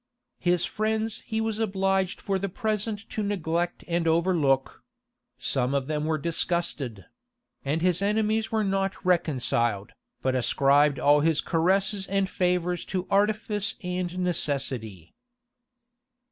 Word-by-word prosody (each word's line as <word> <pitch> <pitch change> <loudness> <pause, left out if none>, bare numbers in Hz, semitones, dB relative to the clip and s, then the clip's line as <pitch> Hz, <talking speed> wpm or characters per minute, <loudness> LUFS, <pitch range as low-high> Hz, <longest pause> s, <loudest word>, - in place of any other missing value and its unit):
[] - - -55
His 175 -1 +2
friends 220 +1 -1
he 220 - -1
was 220 -1 -1
obliged 195 -3 0
for 195 -1 -1
the 200 +1 -2
present 215 0 -2
to 215 - -2
neglect 175 -4 -1
and 170 -1 0
overlook: 160 -5 +1 0.6
some 130 0 0
of 135 -2 0
them 150 +1 -2
were 160 0 +1
disgusted; 155 - -2 0.6
and 150 +4 -1
his 180 0 +2
enemies 220 +2 +1
were 220 -1 +1
not 195 -1 0
reconciled, 125 - +1 0.3
but 130 - +1
ascribed 140 +3 +3
all 145 +1 +4
his 160 +1 +2
caresses 190 +4 +1
and 195 0 +1
favors 180 -1 0
to 185 -1 -3
artifice 210 0 +1
and 180 0 -3
necessity. 135 - -2
180 Hz, 130 wpm, -26 LUFS, 150-200 Hz, 0.6 s, all